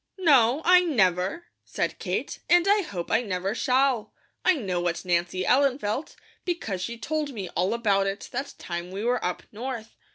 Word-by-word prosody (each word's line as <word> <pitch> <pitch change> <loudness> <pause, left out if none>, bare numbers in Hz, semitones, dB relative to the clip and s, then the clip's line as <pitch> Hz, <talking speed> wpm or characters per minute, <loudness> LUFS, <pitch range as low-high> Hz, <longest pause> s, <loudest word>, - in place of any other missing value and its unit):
"No, 285 -5 +4
I 360 +1 +8
never," 200 - +1 0.2
said - - -3
Kate, - - -3
"and 350 +1 +5
I 410 +1 +5
hope 185 - -5
I - - +4
never 195 -3 -2
shall. 255 -3 +1 0.3
I 370 - +4
know 190 - -2
what 175 +1 -2
Nancy 175 +1 0
Ellen 270 0 +3
felt, 220 +5 -3 0.3
because 280 - -3
she 235 +5 -4
told 300 +2 -2
me 195 -6 -5
all 185 +6 0
about 200 -4 +2
it 195 +2 -4
that 270 +3 -4
time 175 0 -5
we 195 +3 -5
were 245 +1 +1
up 180 - -2
North. 230 0 -6
230 Hz, 175 wpm, -26 LUFS, 185-280 Hz, 0.3 s, I